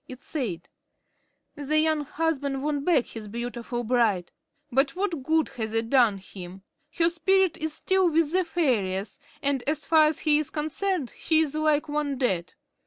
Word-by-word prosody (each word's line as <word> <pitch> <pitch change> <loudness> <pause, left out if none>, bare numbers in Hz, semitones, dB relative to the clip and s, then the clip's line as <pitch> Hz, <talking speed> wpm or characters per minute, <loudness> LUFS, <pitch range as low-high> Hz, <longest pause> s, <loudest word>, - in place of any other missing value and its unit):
It 255 -1 -10
said: 210 - -4 0.9
"The 295 +1 -1
young 310 -1 +2
husband 280 -4 -2
won 290 -1 -1
back 300 -7 +3
his 220 -2 -8
beautiful 240 +2 -4
bride. 220 -7 +1 0.4
But 275 +4 +2
what 360 -6 -2
good 320 +4 +1
has 225 -4 -4
it 225 0 -1
done 240 -7 +4
him? 190 -1 -10 0.3
Her 335 -1 +4
spirit 370 +1 +2
is 315 -1 -2
still 380 +2 +2
with 320 -1 +2
the 370 +1 +2
fairies, 220 - -1 0.2
and, 275 -3 +1
as 300 -1 -1
far 315 -1 +5
as 305 - -2
he 305 -1 +4
is 305 - -3
concerned, 315 0 -2
she 320 -1 +2
is 305 -3 -1
like 310 0 +1
one 295 -2 -2
dead." 190 -10 -1
290 Hz, 170 wpm, -26 LUFS, 240-315 Hz, 0.9 s, far